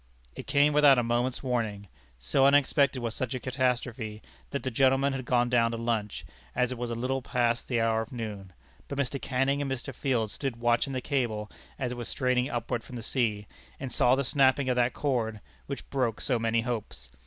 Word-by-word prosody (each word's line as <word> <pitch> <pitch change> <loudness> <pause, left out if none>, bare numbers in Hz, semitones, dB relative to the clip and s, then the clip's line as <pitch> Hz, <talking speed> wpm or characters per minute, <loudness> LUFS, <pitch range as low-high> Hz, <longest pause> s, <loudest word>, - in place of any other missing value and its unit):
It - - -8
came 145 +1 +4
without 145 -2 +7
a 120 - +2
moment's 120 +3 0
warning. 110 -6 -2 0.3
So 65 - +3
unexpected 140 -2 +3
was 115 -2 -2
such 130 +2 -3
a - - -3
catastrophe, 125 -4 -2 0.3
that - - -3
the 130 - -2
gentlemen 135 +3 +3
had 130 -2 -4
gone 120 -1 +2
down 120 -1 +3
to 115 - -3
lunch, 115 -3 -2 0.3
as 125 0 +1
it 125 - -4
was 120 -1 -3
a 115 - -2
little 130 +3 -1
past 120 -3 0
the 120 -2 0
hour 115 0 +2
of 115 - -7
noon. 105 -6 -6 0.4
But 140 - -5
Mr. 140 0 -1
Canning 135 +2 0
and 140 - -2
Mr. 130 -1 -4
Field 120 -6 0
stood 135 -1 -3
watching 120 +3 +1
the 130 - -2
cable 115 -7 -1 0.3
as 130 -3 -2
it 125 - -5
was 120 - -5
straining 125 0 +1
upward 120 0 -2
from 125 - -10
the 115 - -6
sea, 110 -5 0 0.3
and 135 -2 -5
saw 125 +2 +4
the 140 - 0
snapping 135 0 +3
of 125 - +2
that 125 0 +2
cord, 115 -7 -1 0.3
which 140 - -6
broke 125 -5 0
so 125 -4 0
many 115 0 +1
hopes. 110 - -5
125 Hz, 210 wpm, -28 LUFS, 115-135 Hz, 0.4 s, without